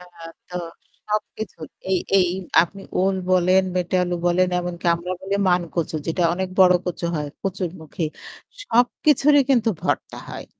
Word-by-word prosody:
আ 180 - -12 0.5
তো 180 - -5 0.5
সবকিছু। 210 -2 -4 0.3
এই 185 - +3 0.2
এই 180 -2 +3 0.3
আপনি 195 +3 -7 0.2
ওল 190 +1 +2 0.2
বলেন, 185 +1 +4
মেটে 180 +1 0
আলু 175 0 -2
বলেন 180 +1 +3
এমনকি 175 -1 -4
আমরা 180 +2 -5
বলি 195 +1 -3
'মান-কচু' 170 -3 0
যেটা 165 +2 0
অনেক 190 0 -2
বড় 180 -1 +7
কচু 175 -1 -4
হয় 150 -1 -2
'কচুরমুখি'। 175 -4 -4 0.5
সবকিছুরই 280 - +3
কিন্তু 235 -4 +3
ভর্তা - - -2
হয়। - - -8
180 Hz, 140 wpm, -22 LUFS, 175-195 Hz, 0.5 s, বড়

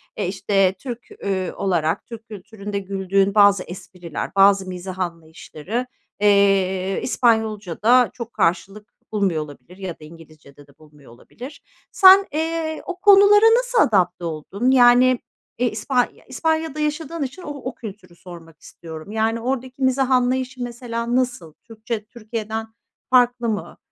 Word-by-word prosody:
E, - - -2
işte, 195 0 +1
Türk, 245 -3 -8
üüü, 190 -2 -2
olarak, 170 -3 -1
Türk 225 -2 -11
kültüründe 205 0 -7
güldüğün 195 0 0
bazı 200 -2 +5
espriler, 175 -1 -8
bazı 195 -1 +4
mizah 185 +1 -7
anlayışları, 170 +6 -5 0.3
eee, 195 -2 +2
İspanyolca'da 220 0 +2
çok 235 -1 -8
karşılık 195 +5 -2 0.2
bulmuyor 195 -7 0
olabilir 145 +4 -14
ya 190 -3 -5
da - - -14
İngilizce'de 155 -3 -16
de 140 - -24
bulmuyor 150 -4 -18
olabilir. 250 - -12 0.3
Sen, 385 0 +7
eee, 320 0 -2
o 365 0 -6
konulara 410 +1 +6
nasıl - - +1
adapte 180 -5 +1
oldun? 180 - -2
Yani, 250 0 +5 0.4
e, 245 0 +1
ispan 245 +4 0 0.2
İspanya'da 315 +2 -2
yaşadığın 305 +1 -3
için 275 +8 -7
o 300 - -8
o 275 -3 -6
kültürü 205 -5 -11
sormak 170 -2 -14
istiyorum. 160 +3 -11
Yani, 225 +1 0
oradaki 260 +2 -4
mizah 260 0 +1
anlayışı, 255 0 0
mesela, 235 0 -4
nasıl? 245 -11 -2
Türkçe, 225 -1 -6
Türkiye'den 220 -1 -6 0.4
farklı 245 -2 +3
mı? 190 -6 -4
215 Hz, 135 wpm, -21 LUFS, 185-255 Hz, 0.4 s, Sen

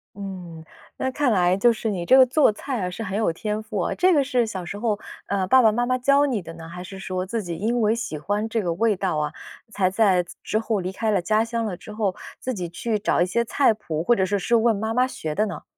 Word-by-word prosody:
嗯， 180 -5 -8 0.3
那 260 - -1
看 260 -2 +1
来 180 -1 +3
就 235 +3 +4
是 220 0 -3
你 175 -4 -3
这 260 - +6
个 265 - +9
做 270 -2 +4
菜 255 +3 -4
啊， - - -2
是 200 +5 -7
很 200 -1 -3
有 215 -7 +1
天 210 +4 -3
赋， 210 -4 -2
这 370 0 +4
个 285 -3 +4
是 250 -3 +1
小 190 -5 -5
时 200 +3 -6
候， 210 -2 -1 0.3
呃， 195 -2 -1
爸 260 +5 +6
爸 220 - +6
妈 240 +2 0
妈 255 0 +1
教 280 +3 +3
你 245 -6 0
的 165 -3 -9
呢， 165 0 -10
还 180 +1 -8
是 190 +1 -9
说 185 -1 -3
自 225 +3 -3
己 170 -3 -5
因 230 +5 0
为 215 +1 +3
喜 155 -10 -4
欢 205 +7 -1
这 225 -1 -1
个 175 -3 -1
味 215 +3 +2
道 185 -4 -1
啊， 150 0 -1 0.4
才 190 -3 +1
在 190 -3 +3 0.2
之 215 - 0
后 220 -2 -1
离 185 +1 -3
开 220 +3 -2
了 200 -3 +2
家 215 +5 +2
乡 230 0 -2
了 190 -4 -3
之 200 +4 -12
后， 210 -4 -1 0.2
自 255 - -3
己 180 -6 -4
去 215 +5 -2
找 205 - +1
一 - - +1
些 235 +6 0
菜 235 0 +3
谱， 160 -7 -4
或 240 +6 +4
者 190 - +1
是 200 +2 0
是 235 +5 +1
问 225 -1 +3
妈 220 +2 -2
妈 250 +1 +3
学 155 -11 -5
的 215 +6 +1
呢？ - - -7
210 Hz, 290 characters per minute, -23 LUFS, 185-230 Hz, 0.4 s, 个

